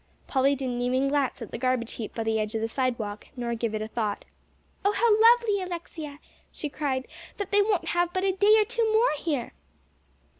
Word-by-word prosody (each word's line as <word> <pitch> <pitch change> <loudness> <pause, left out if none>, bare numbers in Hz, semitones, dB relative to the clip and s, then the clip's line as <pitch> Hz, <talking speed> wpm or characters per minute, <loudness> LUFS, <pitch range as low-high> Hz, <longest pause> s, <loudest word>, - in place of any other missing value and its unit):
Polly 275 +1 +2
didn't 250 -2 -3
even 255 +2 +1
glance 275 -3 0
at 225 - -10
the - - -5
garbage 255 -2 0
heap 220 - -6
by 225 - -2
the 220 0 0
edge 215 +1 -2
of 220 - -1
the 225 - 0
sidewalk, 225 -4 -2
nor 240 -2 -2
give 230 -1 -2
it 215 - -2
a - - -5
thought. 220 -3 -3 0.6
"Oh, 405 +1 +3
how 460 +2 +3 0.2
lovely, 465 -4 +3
Alexia," 335 -5 -6 0.3
she 300 - -5
cried, 275 -3 -2 0.3
"that 405 -1 -4
they 410 0 +5
won't 395 -5 0
have 350 0 +1
but 370 +1 -1
a 390 - +3
day 410 +3 +5
or 430 - +4
two 460 0 0
more 450 +3 +4
here!" 285 -8 -2
275 Hz, 210 wpm, -27 LUFS, 235-390 Hz, 0.6 s, they